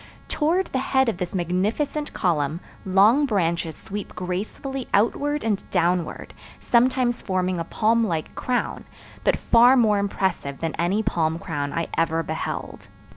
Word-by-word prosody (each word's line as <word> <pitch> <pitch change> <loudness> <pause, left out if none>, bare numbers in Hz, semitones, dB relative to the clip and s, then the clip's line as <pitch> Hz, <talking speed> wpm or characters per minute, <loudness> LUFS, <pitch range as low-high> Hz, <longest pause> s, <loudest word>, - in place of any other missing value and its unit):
Toward 330 +5 +1
the 260 - +1
head 265 -1 +2
of 215 - -3
this 180 0 -4
magnificent 210 - -1
column 155 -3 0 0.3
long 210 +10 +5
branches 170 - 0
sweep 205 +1 -7
gracefully 215 +9 -4
outward 290 +8 +1
and 210 -3 0
downward, 175 -1 0 0.3
sometimes 245 0 +2
forming 185 -2 -1
a - - -1
palm 230 +5 +2
like 160 -4 -3
crown, 250 -1 -2 0.4
but - - +3
far 245 +3 +5
more 215 -4 +4
impressive 190 -8 -2
than 165 -1 -2
any 190 +6 +1
palm 160 -4 0
crown 145 -4 -3
I 165 +2 -2
ever 165 0 +1
beheld. 160 +1 -5
195 Hz, 140 wpm, -24 LUFS, 170-245 Hz, 0.4 s, long